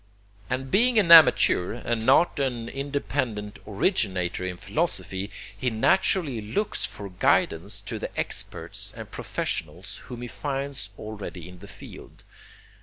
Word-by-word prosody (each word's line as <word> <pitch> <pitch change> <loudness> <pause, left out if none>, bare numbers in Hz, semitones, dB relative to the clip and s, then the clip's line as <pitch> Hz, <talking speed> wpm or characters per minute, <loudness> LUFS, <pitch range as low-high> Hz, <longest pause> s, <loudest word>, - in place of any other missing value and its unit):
And 130 +1 -3
being 240 +3 +4
an 190 -6 +4
amateur 155 - +7
and 120 -1 -2
not 135 +6 +4
an 125 -4 -1
independent 135 -7 -3
originator 95 - 0
in 90 -1 -4
philosophy 95 +2 -2 0.3
he 125 +5 -1
naturally 135 - +2
looks 195 - -1
for 100 -1 -9
guidance 90 +2 +1
to 110 +1 -6
the - - -5
experts - - -2
and - - -8
professionals 80 +5 -4
whom 120 -1 -8
he - - -4
finds 135 -6 -4
already 100 -5 -7
in 90 -1 -12
the 100 - -11
field. - - -12
115 Hz, 130 wpm, -26 LUFS, 100-140 Hz, 0.3 s, amateur